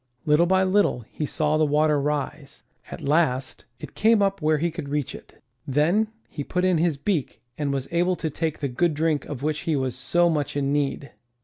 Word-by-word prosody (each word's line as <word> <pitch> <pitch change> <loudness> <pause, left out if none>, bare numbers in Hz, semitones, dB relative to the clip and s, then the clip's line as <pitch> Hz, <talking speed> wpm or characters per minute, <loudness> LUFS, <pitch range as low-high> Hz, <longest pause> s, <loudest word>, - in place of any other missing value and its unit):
Little 155 +3 +4
by 190 +1 +3
little 190 -8 +2
he 150 - -3
saw 155 +1 +1
the - - +4
water 150 0 +2
rise. 145 0 -3 0.3
At - - -8
last, 140 -4 0
it - - -9
came 220 0 +4
up 195 -2 +1
where 155 0 +2
he 170 +3 0
could 145 -3 -6
reach 145 -2 -2
it. - - -14 0.2
Then 160 +11 +2 0.2
he 145 - -6
put 180 +5 -1
in 180 -3 +3
his 165 -3 +1
beak 155 -1 -2 0.2
and 145 -2 -2
was 135 -1 -2
able 175 +2 +2
to 160 -3 -3
take 160 +1 -2
the 140 - -2
good 150 +5 0
drink 155 -2 0
of 140 -2 -7
which 155 0 0
he 160 -1 -1
was 130 -3 -1
so 175 +7 +2
much 150 -3 -1
in 140 0 0
need. 140 -1 -1
150 Hz, 210 wpm, -24 LUFS, 140-170 Hz, 0.3 s, Little